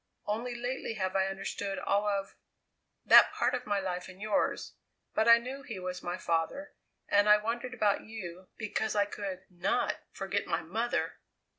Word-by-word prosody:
Only 235 +4 -2
lately 245 -1 -3
have 190 -2 -2
I 190 0 +3
understood 195 0 -3
all 205 +1 +1
of 200 -1 -1 0.7
that - - +9
part - - +1
of 250 -2 -3
my 205 -1 +1
life 180 -2 -3
and 185 0 -12
yours 210 0 0 0.4
but 220 - +2
I 235 0 +10
knew 255 +4 -6
he 225 -6 -7
was 180 0 -5
my 175 +1 -3
father, 170 - -1 0.3
and 205 +1 +4
I 210 - +9
wondered 235 +4 -3
about 210 -4 +2
you, 185 -5 -8
because 215 0 -2
I 205 -1 +4
could 195 -2 -5
not 175 -2 0
forget 195 +1 -2
my 165 -1 -1
mother! 225 +9 -1
205 Hz, 170 wpm, -31 LUFS, 190-225 Hz, 0.7 s, I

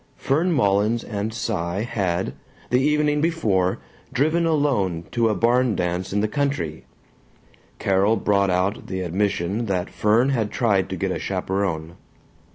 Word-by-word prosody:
Fern 160 +7 +1
Mullins 110 -3 +2
and 105 0 -3
Cy 100 -5 -2
had, 95 -6 -1 0.4
the 125 +1 +4
evening 150 +1 +2
before, 105 - +1 0.3
driven 155 +6 +2
alone 125 - +1
to 115 -2 +2
a 105 - +1
barn 120 -1 +2
dance 90 +1 -2
in 100 +1 +1
the 110 - +1
country. 135 - -2 0.9
(Carol 100 +3 +2
brought 100 -1 +2
out 90 +3 0
the 95 -1 -3
admission 95 +4 -1
that 95 -1 -2
Fern 115 +5 +2
had 115 -6 0
tried 105 -6 +1
to - - -3
get - - -2
a - - -2
chaperon.) 90 -4 -2
105 Hz, 145 wpm, -23 LUFS, 95-125 Hz, 0.9 s, the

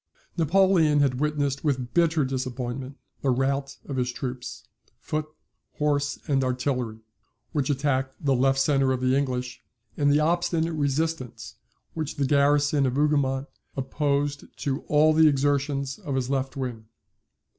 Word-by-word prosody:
] - - -33
Napoleon 165 -2 +4
had 130 -3 +1
witnessed 145 -2 -1
with 130 -5 -1
bitter 165 -4 +3
disappointment 130 0 -4 0.2
the 140 - 0
rout 135 +2 0
of 140 - -5
his 125 -1 0
troops, 125 0 -6 0.4
foot, 155 0 -3 0.5
horse, 145 -1 0
and 135 -3 +2
artillery, 125 -3 -2 0.5
which 145 -4 -1
attacked 135 -1 0
the 140 -2 +1
left 135 +1 +3
centre 135 -1 +2
of 130 - -2
the 130 +1 +2
English, 125 -3 -2 0.3
and 145 -1 +2
the 145 - +4
obstinate 170 +1 +1
resistance 145 -3 -2 0.4
which 155 -3 -4
the 140 - 0
garrison 145 0 +3
of 125 - -2
Hougoumont 140 -2 +1 0.3
opposed 140 +1 -1 0.2
to 140 +1 -1
all 155 +1 +4
the 160 0 +6
exertions 140 -1 0
of 140 - -4
his 130 0 -1
left 135 +1 -2
wing. 120 -4 -4
140 Hz, 145 wpm, -26 LUFS, 130-150 Hz, 0.5 s, the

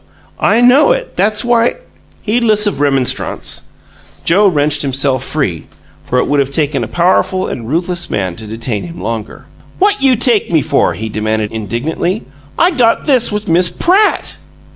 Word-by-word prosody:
"I 230 - +3
know 260 - +5
it. - - -5
That's 215 +3 +1
why 235 -1 +2 0.2
" - - -33
Heedless 220 -1 +2
of 205 - -1
remonstrance, 135 -3 -1 0.6
Joe 200 +5 +4
wrenched 150 -4 +1
himself 135 -2 -1
free, 100 - -3 0.4
for 125 - -1
it - - +2
would 145 0 +1
have 135 -1 +1
taken 145 -1 -1
a - - -4
powerful 185 +1 +1
and 115 -2 -6
ruthless 175 +3 -2
man 95 -4 -2
to 110 - -8
detain 110 -2 -4
him 85 0 -9
longer. 110 +2 -5 0.3
"What 405 +1 +2
you 265 -2 +4
take 235 -5 +2
me 160 -3 +2
for?" 155 -3 +1
he 110 - -5
demanded, 110 0 -2
indignantly. 130 - -3 0.3
"I 350 +2 +3
got 245 -8 +1
this 255 -6 +3
with 210 0 -3
Miss 175 +1 +3
PRATT!" 390 - +1
165 Hz, 165 wpm, -14 LUFS, -, 0.6 s, know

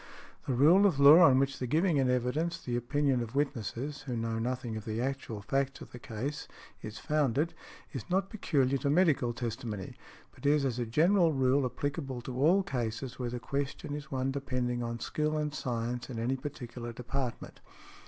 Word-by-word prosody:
The 130 - +1
rule 170 +10 +6
of 155 -8 0
law 145 +4 +9
on 140 -7 +7
which 135 0 +1
the 125 - -2
giving 160 +4 +2
in 130 -2 +2
evidence 125 +7 0
the 120 -6 -4
opinion 135 +1 +1
of 115 +1 -6
witnesses, 140 +1 -2
who 130 -4 -4
know 115 0 -2
nothing 125 -1 -3
of 110 - -5
the 110 +1 -3
actual 125 -5 -3
facts 135 +4 -1
of - - -11
the 125 - -9
case, 130 +7 -5 0.3
is 110 0 -7
founded, 150 +3 0 0.4
is 130 -7 -6
not 195 +2 0
peculiar 140 - +1
to 140 - 0
medical 150 -6 +3
testimony, 115 -4 -5 0.4
but - - -18
is 145 -1 +3
as 125 -2 -1
a 120 - -2
general 165 - +4
rule 135 0 +2
applicable 135 -1 -4
to 125 +1 -6
all 165 +9 +4
cases 125 - -4
where 125 -1 -2
the 120 +1 -4
question 140 +3 -3
is 145 -1 -6
one 135 0 -1
depending 125 -3 -2
on 115 0 -3
skill 155 +5 -1
and 150 -1 -2
science 125 -2 -3
in 125 - -5
any 120 +4 0
particular 120 -4 -6
department. 125 +1 -5
130 Hz, 185 wpm, -31 LUFS, 120-145 Hz, 0.4 s, law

